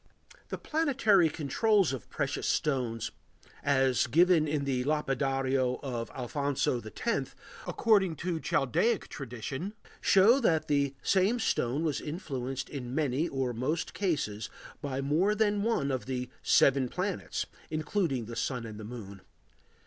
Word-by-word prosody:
] - - -24
The - - -3
planetary 230 - +3
controls 170 - +2
of 125 -6 -7
precious - - -2
stones 125 -7 0 0.5
as 130 -3 +2
given 165 +3 +4
in 145 -1 0
the 130 -2 0
Lapidario 135 -3 0
of 120 -4 -3
Alfonso 130 -1 -1
X, 115 - -3 0.3
according 195 -7 +3
to 170 +2 -2
"Chaldaic" 195 - +1
tradition, 135 - -5 0.3
show 215 +7 +6
that 165 - +2
the 140 -1 +1
same 195 +5 +3
stone 140 - 0
was 155 -4 -1
influenced 135 -5 -4
in 130 -3 -6
many 150 +1 +1
or 130 -3 -1
most 140 +8 -2
cases 140 - -1 0.3
by 135 -1 -2
more 165 +10 +2
than 205 -1 +2
one 200 -11 +1
of 130 -1 -3
the 125 -1 -3
"seven 135 -2 +4
planets" 185 +5 -2 0.2
(including 155 - -1
the 115 +1 -7
Sun 125 0 -2
and 110 -1 -8
Moon). 105 -4 -8
140 Hz, 135 wpm, -30 LUFS, 125-175 Hz, 0.5 s, show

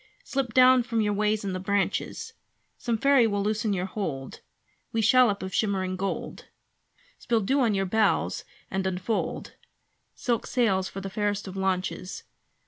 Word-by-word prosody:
Slip 265 - -3
down 255 0 +7
from 230 -2 -1
your 210 -1 +1
ways 210 +1 +1
in 195 - -2
the 185 - -3
branches 200 +1 -1 0.5
Some 235 -2 -1
fairy 275 -1 +5
will 205 -2 -1
loosen 215 +1 0
your 185 -2 -1
hold 160 -10 -5 0.5
Wee 225 - -1
shallop 220 -3 +4
of 190 0 -5
shimmering 190 -3 0
gold. 195 +1 -4 0.7
Spill 230 -2 +1
dew 265 +8 +1
on 230 -6 +2
your 195 0 +1
bows 220 +3 +1 0.3
and 190 0 -1
unfold 190 +4 -2 0.6
Silk 235 -3 -1
sails 195 -7 +1
for 195 - -7
the 195 - -5
fairest 205 0 -1
of 190 - -7
launches! 190 -1 -2
205 Hz, 155 wpm, -27 LUFS, 190-230 Hz, 0.7 s, down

